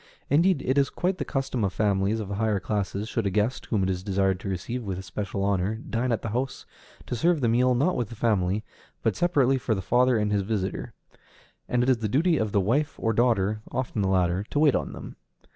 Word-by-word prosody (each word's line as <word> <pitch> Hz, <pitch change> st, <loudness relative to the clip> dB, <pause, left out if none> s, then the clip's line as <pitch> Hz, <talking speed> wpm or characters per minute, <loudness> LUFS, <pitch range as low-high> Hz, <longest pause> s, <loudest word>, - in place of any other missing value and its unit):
Indeed, 165 Hz, 0 st, +3 dB
it 130 Hz, +2 st, +2 dB
is 135 Hz, -, +2 dB
quite 185 Hz, +1 st, -1 dB
the -, -, -2 dB
custom 130 Hz, -4 st, -2 dB
in 100 Hz, -, +2 dB
families 100 Hz, +2 st, +1 dB
of 105 Hz, -, -4 dB
the 100 Hz, -, -4 dB
higher 110 Hz, -3 st, +1 dB
classes, 100 Hz, +1 st, -2 dB
should 115 Hz, -2 st, -1 dB
a -, -, +2 dB
guest, 105 Hz, +6 st, -1 dB
whom 105 Hz, -5 st, +1 dB
it 95 Hz, -, 0 dB
is 90 Hz, -1 st, -3 dB
desired 95 Hz, -1 st, 0 dB
to 95 Hz, -, -5 dB
receive 100 Hz, +7 st, -3 dB
with 95 Hz, -3 st, -4 dB
especial 95 Hz, +1 st, -4 dB
honor, 100 Hz, +1 st, +1 dB
dine 120 Hz, +2 st, -2 dB
at 115 Hz, -, -1 dB
the 115 Hz, -, -2 dB
house, 125 Hz, +5 st, -3 dB, 0.4 s
to -, -, -3 dB
serve 165 Hz, +7 st, +2 dB
the 125 Hz, -, +1 dB
meal, 125 Hz, +2 st, +3 dB
not 150 Hz, +9 st, +2 dB
with 120 Hz, -4 st, -2 dB
the 115 Hz, -, -8 dB
family, 105 Hz, -2 st, +1 dB, 0.4 s
but -, -, +1 dB
separately 140 Hz, -7 st, +2 dB
for 115 Hz, -2 st, 0 dB
the -, -, -3 dB
father 125 Hz, +2 st, +3 dB
and 105 Hz, -1 st, 0 dB
his 100 Hz, -1 st, +2 dB
visitor; 100 Hz, -1 st, -3 dB, 0.7 s
and 125 Hz, 0 st, +2 dB
it 125 Hz, -, +1 dB
is 130 Hz, -, +4 dB
the 110 Hz, -2 st, -2 dB
duty 160 Hz, -, +3 dB
of 110 Hz, -4 st, -1 dB
the 100 Hz, -, +2 dB
wife 140 Hz, +10 st, +1 dB
or 115 Hz, -1 st, 0 dB
daughter, 110 Hz, -3 st, +2 dB
oftener 120 Hz, -4 st, -2 dB
the 95 Hz, -, +1 dB
latter, 90 Hz, 0 st, +1 dB
to -, -, -3 dB
wait 145 Hz, -2 st, +5 dB
on -, -, -2 dB
them. -, -, -9 dB
110 Hz, 235 wpm, -26 LUFS, 100-125 Hz, 0.7 s, wait